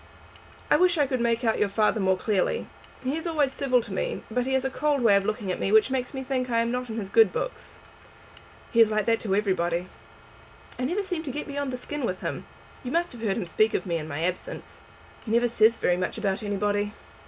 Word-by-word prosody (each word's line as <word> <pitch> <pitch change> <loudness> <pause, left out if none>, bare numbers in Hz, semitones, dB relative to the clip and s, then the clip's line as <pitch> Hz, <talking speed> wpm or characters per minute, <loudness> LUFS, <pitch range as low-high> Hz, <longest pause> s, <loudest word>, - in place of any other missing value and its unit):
"I - - +7
wish 360 -1 +3
I 290 - +4
could 255 -2 -1
make 235 0 +1
out 225 -2 +1
your 205 - +2
father 215 +2 +2
more 190 -1 +2
clearly. 215 - 0 0.4
He 260 +3 -1
is 325 +2 -3
always 295 -5 +1
civil 255 -4 +1
to 205 - -8
me, - - -2
but 250 +2 0
he 265 - 0
has 265 0 +1
a 265 - -1
cold 290 0 0
way 210 -4 +6
of 200 0 +2
looking 210 -3 -2
at - - -3
me 195 - 0
which 220 +4 +5
makes 255 -2 -1
me 265 - -3
think 255 -1 -2
I 230 - +1
am 230 0 -1
not 250 0 -3
in 220 - -4
his 200 -3 -4
good 225 -4 +6
books." - - -5 0.9
"He 230 - +5
is 225 - +6
like 215 -1 0
that 230 -1 +2
to 195 -3 -1
everybody." 180 -3 0 0.9
"I 250 - 0
never 370 +9 -1
seem 360 -4 -2
to 300 -4 -5
get 295 +3 -4
beyond 285 -2 -3
the 250 - -3
skin 295 +3 -5
with 185 -6 -2
him. - - -4 0.4
You 250 - -4
must 345 +2 0
have 240 - -11
heard 205 -4 0
him 210 - -2
speak 215 +6 +2
of - - -1
me 170 -3 -1
in 155 -1 -5
my 150 +1 -3
absence?" 180 +1 -4 0.4
"He - - -8
never 235 +1 +4
says 230 0 +4
very 180 - +1
much 185 - -2
about 195 -2 -1
anybody." 205 0 -1
230 Hz, 245 wpm, -26 LUFS, 200-265 Hz, 0.9 s, I